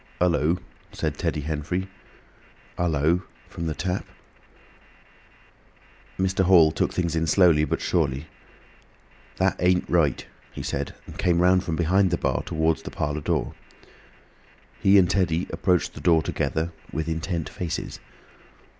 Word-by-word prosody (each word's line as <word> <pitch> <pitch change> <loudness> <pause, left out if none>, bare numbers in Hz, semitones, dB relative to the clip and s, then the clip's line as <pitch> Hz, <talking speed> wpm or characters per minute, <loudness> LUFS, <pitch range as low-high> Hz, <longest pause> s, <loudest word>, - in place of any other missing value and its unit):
"Hul 90 - +3
lo!" 80 +2 +1 0.3
said - - -3
Teddy 75 - -1
Henfrey. 80 +5 -3 0.9
"Hul 85 0 0
lo!" 80 +4 +2 0.3
from 85 -3 -5
the 80 - -2
Tap. 90 +3 -2 2.1
Mr. 95 0 +1
Hall 85 -4 +6
took - - 0
things 85 -2 -1
in 80 0 0
slowly 80 -3 +5
but - - -2
surely. 70 -4 0 1.1
"That - - +1
ain't 90 +1 +2
right," 80 -6 +1 0.3
he - - -6
said, - - -3
and - - -11
came 85 -1 +2
round 90 +1 +4
from 85 - -2
behind 90 +4 +3
the 85 - 0
bar - - 0
towards 80 0 0
the - - -7
parlour 75 +1 -3
door. - - -1 1.3
He 100 +1 +5
and 95 -2 +5
Teddy 90 -2 +1
approached 90 -3 +1
the - - -9
door 80 -2 +4
together, 80 +4 -2 0.2
with 80 +1 -3
intent 80 0 -2
faces. 85 -3 -5
85 Hz, 140 wpm, -25 LUFS, 80-90 Hz, 2.1 s, Hall